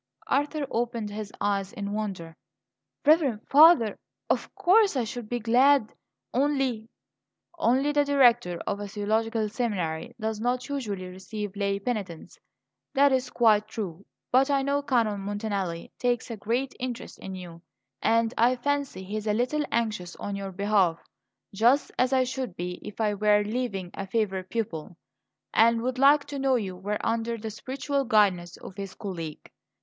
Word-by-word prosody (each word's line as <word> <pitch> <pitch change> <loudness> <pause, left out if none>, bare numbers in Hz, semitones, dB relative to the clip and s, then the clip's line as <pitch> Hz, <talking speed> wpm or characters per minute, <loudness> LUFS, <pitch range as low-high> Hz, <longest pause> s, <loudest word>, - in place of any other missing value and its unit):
Arthur 290 +1 0
opened 230 -2 -2
his 210 0 -6
eyes 200 -1 0
in 200 -1 -4
wonder. 190 -6 -4 0.7
"Reverend 290 -8 +4
Father, 290 -7 +6 0.3
of - - -1
course 395 0 +4
I 250 - +1
should 235 -1 -6
be 245 - -1
glad; 240 +1 +4 0.4
only 265 -4 0 0.3
" 345 - -32
"Only 270 +4 +3
the 295 0 +3
Director 240 -10 +4
of 200 0 -2
a 205 - -5
theological 220 +2 0
seminary 195 -9 -3
does 220 -1 -2
not 245 +1 -1
usually 215 -10 -3
receive 190 +2 -6
lay 200 -1 0
penitents? 200 -6 -5 0.6
That 280 +1 +5
is 260 -1 +1
quite 215 -4 +3
true. 195 -5 -6 0.3
But 265 +3 +4
I 275 -1 +2
know 280 +1 +1
Canon 230 -7 +1
Montanelli 200 -4 -3
takes 245 -1 0
a - - -3
great 235 +6 -2
interest 250 -2 -5
in 190 0 -7
you, 175 -2 -9 0.4
and 230 0 +2
I 245 +3 +4
fancy 280 -6 -2
he 200 +3 -4
is 215 0 -5
a 210 - +2
little 255 +6 0
anxious 215 -6 -1
on 205 - -5
your 195 -1 -5
behalf 195 -3 +2 0.6
just 240 +8 +3
as 255 +1 +3
I 260 -1 +4
should 255 -5 -4
be 180 +1 -5
if 210 - -9
I 215 -2 +2
were 210 0 +3
leaving 205 -5 -3
a 195 - -5
favourite 190 -3 -1
pupil 190 -8 -4 0.6
and 230 +1 +4
would 255 0 -2
like 285 +2 +6
to 285 -1 -6
know 270 -1 +2
you 195 -6 -2
were 205 +3 -3
under 230 0 -1
the 220 0 -6
spiritual 275 +5 -2
guidance 190 -6 +2
of - - -10
his 195 -1 -7
colleague. 165 -7 -7
220 Hz, 165 wpm, -27 LUFS, 200-255 Hz, 0.7 s, Father